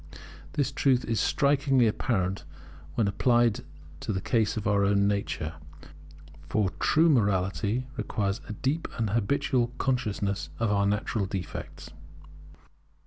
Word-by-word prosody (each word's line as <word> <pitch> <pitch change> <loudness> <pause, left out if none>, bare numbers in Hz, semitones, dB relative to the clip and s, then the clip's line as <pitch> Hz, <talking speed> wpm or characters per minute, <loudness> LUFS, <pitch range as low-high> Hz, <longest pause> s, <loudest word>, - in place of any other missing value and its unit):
This 145 -2 0
truth 130 -2 +2
is 115 -2 0
strikingly 140 -3 +3
apparent 100 -4 0 0.5
when 110 - +2
applied 120 +2 +2 0.4
to 110 - -3
the 95 - -1
case 110 +1 0
of 105 - -3
our 100 -1 +3
own 100 0 +3
nature, 100 -5 -2 1.0
for 100 0 +1
true 160 +2 +4
morality 105 - +1
requires 100 -2 -2
a - - -3
deep 140 +9 -1
and 110 -3 -1
habitual 120 +2 +1
consciousness 105 -6 -1
of 115 -2 0
our 100 -1 +2
natural 105 0 -1
defects. 95 -2 -6
110 Hz, 125 wpm, -28 LUFS, 100-125 Hz, 1.0 s, true